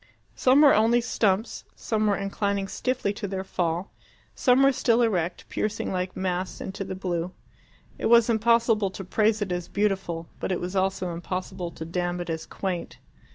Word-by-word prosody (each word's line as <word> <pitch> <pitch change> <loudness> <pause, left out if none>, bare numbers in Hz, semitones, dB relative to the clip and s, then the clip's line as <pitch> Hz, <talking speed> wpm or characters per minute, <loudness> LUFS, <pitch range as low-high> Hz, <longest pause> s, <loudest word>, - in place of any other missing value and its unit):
Some 265 +3 +4
were 290 -2 +8
only 225 +3 +4
stumps, 220 -3 0
some 215 -1 -1
were 205 - +2
inclining 200 0 -1
stiffly 250 -1 -1
to 205 0 -5
their 190 0 -3
fall, 175 -1 -2 0.4
some 255 +1 +4
were 275 - +6
still 240 -2 +2
erect, 180 -6 -1
piercing 215 0 -2
like 185 0 -3
masts 185 0 -2
into 195 +1 -5
the 190 - -5
blue. 180 -1 -3 0.7
It - - 0
was 235 0 +6
impossible 230 -2 +3
to 195 +1 -7
praise 215 +3 +1
it 190 - -5
as 175 -1 -2
beautiful, 190 -5 -1
but - - -2
it 180 - 0
was 180 +2 -5
also 190 -2 0
impossible 175 +1 -4
to 160 - -7
damn 175 +1 -2
it 175 -1 -3
as 160 0 -4
quaint. 185 -3 -4
195 Hz, 175 wpm, -26 LUFS, 180-220 Hz, 0.7 s, were